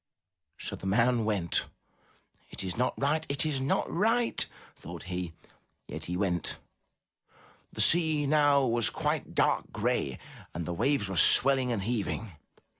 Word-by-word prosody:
'* 80 -2 -54
So - - -6
the 95 - -7
man 115 +3 +2
went. 100 -6 0 0.8
"It - - -4
is 95 -1 -3
not 125 +2 -1
right! 150 +3 +1
It 140 +2 0
is 145 -4 -1
not 135 - 0
right!'* 230 +6 +2 0.3
thought - - -9
he, 90 -2 -5 0.5
yet 80 +1 -7
he 90 +1 -3
went. 90 -4 -1 1.1
The - - -1
sea 160 -3 +2
now 145 -1 +4
was 120 -2 +2
quite - - -3
dark - - +1
gray 65 - -1 0.4
and 85 0 -3
the 90 - -3
waves 120 +3 0
were 95 -2 -4
swelling 130 +6 +4
and 105 -5 -2
heaving. 110 -1 -2
115 Hz, 150 wpm, -29 LUFS, 90-140 Hz, 1.1 s, now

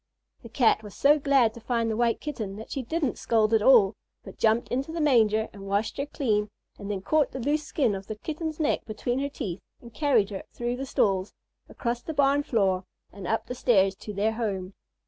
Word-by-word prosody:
The 230 - -11
Cat 230 -2 +3
was 210 -3 -11
so 295 +2 +4
glad 270 -5 +3
to 235 - -10
find 230 0 -1
the 220 - -1
White 235 0 +1
Kitten 220 -10 -5
that 220 +2 -10
she 275 - -2
didn't 290 +1 -2
scold 220 -1 +2
at 220 - +4
all, 215 -4 +6 0.3
but - - -12
jumped 225 +2 +2
into 270 +5 -2
the 335 - -4
manger 220 -7 +3
and 195 -1 -10
washed 205 +2 -1
her 280 - -2
clean, 215 -8 0 0.3
and 200 - -7
then 200 -2 -2
caught 305 +6 +2
the 265 - -4
loose 295 +4 0
skin 260 -8 +1
of 195 0 -6
the 215 - -4
Kitten's 315 +6 -5
neck 305 - +1
between 240 +3 -2
her 280 +1 -1
teeth 200 - -5 0.2
and 235 -1 -14
carried 245 -9 +2
her 195 - -5
through 240 +1 -3
the 270 +1 -5
stalls, 195 -5 +1 0.4
across 240 0 -3
the 320 - -6
barn 280 0 +3
floor, 195 -8 +1 0.3
and 195 -3 -8
up 225 - 0
the - - -5
stairs 195 -6 +3
to 210 - -8
their 205 +2 0
home. 200 -5 -3
230 Hz, 220 wpm, -27 LUFS, 210-275 Hz, 0.4 s, all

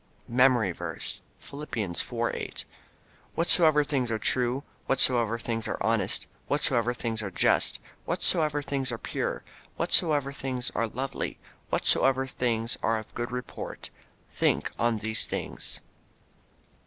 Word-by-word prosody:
MEMORY 125 -5 +4
VERSE, 85 -2 -5 0.2
Philippians 115 -11 -4
4: - - -2
8 - - -6 0.7
"Whatsoever 160 -3 +6
things 135 -4 -1
are 110 - 0
true, 125 +4 +1 0.2
whatsoever 120 -4 +4
things 115 -1 -3
are - - -2
honest, - - +1 0.2
whatsoever 125 -4 +3
things 115 -2 -3
are 100 - -3
just, 85 - +3 0.3
whatsoever 150 -3 +1
things 135 -3 -2
are 115 - -3
pure, - - -3 0.3
whatsoever 145 -4 +2
things 130 -3 -4
are 115 - 0
lovely, 130 +4 -4 0.3
whatsoever 135 0 +3
things 120 -2 -1
are 115 - +2
of 110 - -9
good 120 0 -4
report... 125 -1 -6 0.4
think - - +1
on 120 -1 +2
these 110 +1 +1
things." - - -5
125 Hz, 125 wpm, -28 LUFS, 115-135 Hz, 0.7 s, Whatsoever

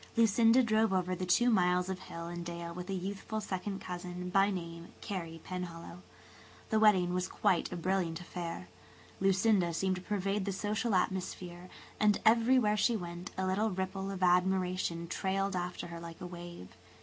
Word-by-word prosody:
Lucinda 230 +2 +5
drove 220 -2 +2
over 185 -1 +1
the 185 0 -3
two 240 +7 +4
miles 180 -3 +3
of 190 -1 -3
hill 170 -2 -7
and 175 0 -5
dale 170 0 -6
with 180 +2 -7
a - - -1
youthful 195 +3 -4
second 195 -1 -4
cousin, 180 0 -6
by 195 +1 +4
name, 170 -3 -5
Carey 170 -6 -5
Penhallow. 175 - -6 0.7
The 220 - +3
wedding 190 -5 +5
was 180 0 0
quite 195 -5 +1
a - - -3
brilliant 175 -2 -1
affair. 175 0 -6 0.5
Lucinda 195 -2 +3
seemed 190 +2 0
to - - -7
pervade 200 0 -1
the 200 - -1
social 210 +2 -1
atmosphere, 180 -1 -2 0.3
and 210 -1 +4
everywhere 225 -1 +4
she 225 +2 +3
went 175 -1 -6
a 190 - 0
little 200 +4 +1
ripple 190 0 -3
of 190 -1 -3
admiration 180 -1 +2
trailed 195 +2 -1
after 180 0 -3
her 170 0 -7
like 165 -1 -9
a 185 - -6
wave. 175 - -9
185 Hz, 170 wpm, -32 LUFS, 175-200 Hz, 0.7 s, Lucinda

